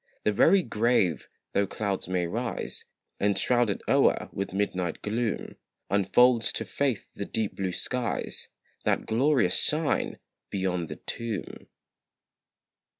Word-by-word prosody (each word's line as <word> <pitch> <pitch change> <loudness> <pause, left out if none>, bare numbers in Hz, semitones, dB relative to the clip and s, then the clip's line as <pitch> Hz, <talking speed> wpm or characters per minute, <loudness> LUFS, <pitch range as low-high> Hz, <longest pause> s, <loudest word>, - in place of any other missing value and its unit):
The 105 - +3
very 190 - +5
grave, 105 - +1 0.2
though 100 0 +2
clouds 100 -1 -2
may 90 -1 0
rise, 115 +7 -4 0.3
And 100 -1 +2
shroud 120 +2 +3
it 100 - -2
o'er - - +3
with 100 0 -3
midnight 95 -3 -1
gloom, 110 +1 -2 0.3
Unfolds 115 +5 +4
to - - -2
faith 135 -6 -1
the 100 - -4
deep 110 -1 -2
blue 95 -1 -1
skies, 125 +6 -3 0.4
That - - +1
glorious 120 -4 +3
shine 155 0 +1 0.3
beyond 90 -3 -1
the - - -5
tomb. 115 -3 -5
105 Hz, 125 wpm, -28 LUFS, 95-120 Hz, 0.4 s, very